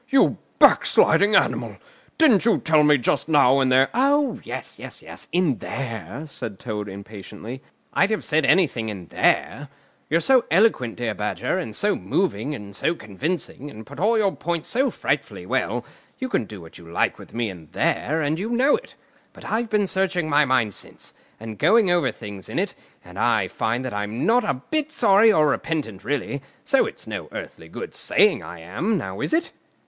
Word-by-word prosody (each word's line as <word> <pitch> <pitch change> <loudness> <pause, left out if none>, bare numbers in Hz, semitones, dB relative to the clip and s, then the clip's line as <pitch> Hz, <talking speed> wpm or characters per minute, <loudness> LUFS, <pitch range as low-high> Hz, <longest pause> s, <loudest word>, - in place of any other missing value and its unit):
"You 270 -1 +3 0.2
backsliding 205 +1 +5
animal, - - +1 0.4
didn't 260 -12 +5
you 230 -1 +3
tell 155 -2 +3
me 150 0 +5
just 125 +5 0
now, 140 -3 +5
in 130 -1 +2
there——" 130 +1 +4
"Oh, 280 +3 +2
yes, - - -7
yes, - - -9
in 170 -8 +1
there," 115 - -5
said 115 -8 -6
Toad 105 -2 -5
impatiently. 105 +5 -9 0.3
"I'd 200 - +3
have 220 - -1
said 155 0 +1
anything 140 -7 +2
in 95 -4 -7
there. 145 +1 +1 0.4
You're 165 - +3
so 255 +5 +4
eloquent, 165 - +2
dear 120 -3 -2
Badger, - - -2
and - - -5
so - - +2
moving, 115 +9 -1
and 100 -4 -9
so 165 +10 0
convincing, 145 - -4
and 110 -5 -11
put 145 +1 -11
all 220 +5 +3
your 200 -3 +1
points 170 -2 -3
so 265 +3 +2
frightfully - - -3
well—you 260 - -4
can 115 - 0
do 105 -3 -10
what 80 0 -13
you 85 -1 -13
like - - 0
with - - -13
me 115 -3 -1
in 85 -4 -13
there, 155 - 0
and 150 +3 -1
you 210 +4 -3
know 255 +4 +3
it. - - -10 0.4
But - - -14
I've 230 +1 0
been 210 -1 +2
searching 190 -3 0
my 150 0 +4
mind 125 -6 +1
since, - - -6 0.3
and 110 -2 -8
going 220 -5 +4
over 175 -1 +2
things 100 -2 -9
in - - -5
it, - - 0 0.3
and - - -10
I - - +2
find 120 +3 -2
that 130 - -4
I'm 105 +4 -3
not 240 +2 +4
a 205 - 0
bit 300 - -3
sorry 215 -5 +5
or 155 -7 +4
repentant 140 - -3
really, 140 0 -2 0.2
so - - +3
it's - - -8
no - - -6
earthly 80 - -8
good - - -7
saying - - +3
I 85 -1 -9
am; 155 - -1
now, 95 - -5
is - - -1
it?" 325 +2 0
145 Hz, 185 wpm, -23 LUFS, -, 0.4 s, backsliding